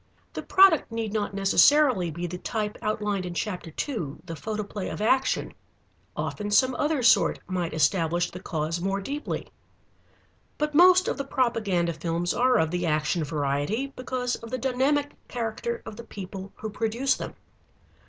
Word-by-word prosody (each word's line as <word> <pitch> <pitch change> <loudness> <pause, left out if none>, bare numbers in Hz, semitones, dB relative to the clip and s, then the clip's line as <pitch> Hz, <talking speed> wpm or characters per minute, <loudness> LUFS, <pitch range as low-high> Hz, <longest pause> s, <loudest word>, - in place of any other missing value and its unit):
The - - -4
product 375 -10 +5
need 225 -2 -3
not 205 -2 -2
necessarily 200 - +4
be 170 +3 -4
the 180 +1 -5
type 210 0 -3
outlined 210 -2 -1
in 175 -1 -5
chapter 180 -4 -3
two, 160 - -4
The 165 - -6
Photoplay 210 +3 -4
of - - -6
Action. 260 +5 +1 0.6
Often 210 -1 -3
some 255 +5 +4
other 295 -3 +1
sort 235 - +5
might 175 -4 -3
establish 175 +1 +1
the 180 - -8
cause 165 -1 -3
more 195 +2 0
deeply. 285 +9 -4 1.1
But 300 0 -1
most 365 +3 +6
of - - -1
the - - 0
propaganda 215 -10 0
films 170 +2 -2
are 250 0 +3
of 160 -5 +1
the 175 -1 -1
action 155 +2 +1
variety, 150 - -1
because 250 -1 -2
of 230 - -10
the 255 - -2
dynamic 270 +4 +1 0.2
character 235 0 -3
of 210 - -8
the 235 - -8
people 195 -2 -8
who 220 0 -6
produce 230 +6 0
them. - - -7
210 Hz, 160 wpm, -26 LUFS, 175-255 Hz, 1.1 s, most